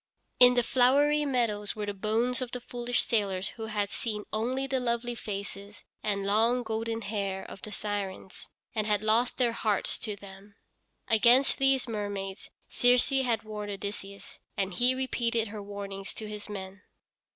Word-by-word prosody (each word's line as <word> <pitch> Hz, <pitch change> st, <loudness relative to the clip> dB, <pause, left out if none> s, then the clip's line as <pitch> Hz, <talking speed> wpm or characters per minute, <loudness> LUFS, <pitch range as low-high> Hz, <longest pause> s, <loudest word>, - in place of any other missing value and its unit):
In 250 Hz, 0 st, +8 dB
the 245 Hz, -, +4 dB
flowery 285 Hz, +5 st, +4 dB
meadows 230 Hz, -6 st, 0 dB
were 210 Hz, -1 st, -3 dB
the 205 Hz, -, -3 dB
bones 225 Hz, +6 st, 0 dB
of 255 Hz, -, -2 dB
the 250 Hz, -, -4 dB
foolish 245 Hz, 0 st, -1 dB
sailors 195 Hz, -4 st, 0 dB
who 225 Hz, -1 st, -7 dB
had 205 Hz, -2 st, -1 dB
seen 210 Hz, -3 st, -3 dB
only 250 Hz, +5 st, 0 dB
the 270 Hz, -1 st, 0 dB
lovely 240 Hz, 0 st, -1 dB
faces 200 Hz, -2 st, -6 dB, 0.2 s
and 200 Hz, -2 st, -1 dB
long, 225 Hz, +5 st, +3 dB
golden 225 Hz, 0 st, -2 dB
hair 200 Hz, -2 st, -2 dB
of 195 Hz, -, -10 dB
the -, -, -7 dB
Sirens, 200 Hz, -2 st, -5 dB, 0.2 s
and 215 Hz, -1 st, -1 dB
had 210 Hz, -1 st, +1 dB
lost 225 Hz, +3 st, +2 dB
their 245 Hz, -2 st, +3 dB
hearts 215 Hz, -3 st, 0 dB
to 210 Hz, -3 st, -4 dB
them. 200 Hz, +1 st, -13 dB, 0.5 s
Against 240 Hz, +4 st, +5 dB
these 270 Hz, -1 st, +3 dB
mermaids 205 Hz, -3 st, -4 dB, 0.2 s
Circe 245 Hz, 0 st, +4 dB
had 250 Hz, -5 st, +1 dB
warned 210 Hz, -1 st, -5 dB
Odysseus, 200 Hz, 0 st, -6 dB, 0.2 s
and 195 Hz, -1 st, -1 dB
he 245 Hz, +6 st, +4 dB
repeated 235 Hz, -4 st, 0 dB
her 210 Hz, 0 st, -6 dB
warnings 200 Hz, -1 st, -6 dB
to 215 Hz, -, -6 dB
his 210 Hz, 0 st, -7 dB
men. 195 Hz, -1 st, -7 dB
215 Hz, 165 wpm, -29 LUFS, 200-245 Hz, 0.5 s, In